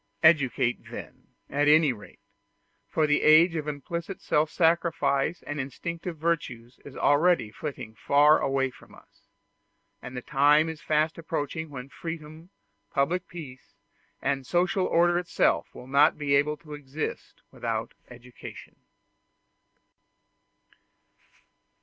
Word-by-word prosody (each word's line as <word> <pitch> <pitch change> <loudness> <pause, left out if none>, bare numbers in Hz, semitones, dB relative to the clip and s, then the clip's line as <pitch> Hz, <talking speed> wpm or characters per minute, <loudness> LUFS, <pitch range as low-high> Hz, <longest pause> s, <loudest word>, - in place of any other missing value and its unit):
Educate, 135 -6 +3
then, - - -10 0.2
at 145 +1 0
any 155 -2 +5
rate; 105 -3 -14 0.7
for 155 - +1
the 145 -1 +2
age 160 +3 +6
of 155 -2 -3
implicit 170 +5 -5
self 150 +1 +1
sacrifice 160 -3 +1
and 145 0 -5
instinctive 165 +5 -5
virtues 130 -7 -3
is 140 - -11
already 145 -6 +3
flitting 110 -2 -7
far 145 +6 +4
away 135 -1 0
from - - -17
us, - - -23 0.7
and 125 - -8
the 125 - -5
time 150 +3 +4
is 160 -2 -7
fast 155 +1 0
approaching 160 0 -4
when 130 -2 -8
freedom, 160 +2 -8 0.4
public 165 +7 0
peace, 140 -7 -11 0.5
and 135 -1 -1
social 180 +2 +1
order 175 +1 +3
itself 180 - +1
will - - -10
not 140 +4 +4
be 145 -2 -1
able 150 +2 +2
to 150 -1 -12
exist 145 +1 -6
without - - -3 0.2
education. 125 0 -12
150 Hz, 120 wpm, -27 LUFS, 140-165 Hz, 0.7 s, age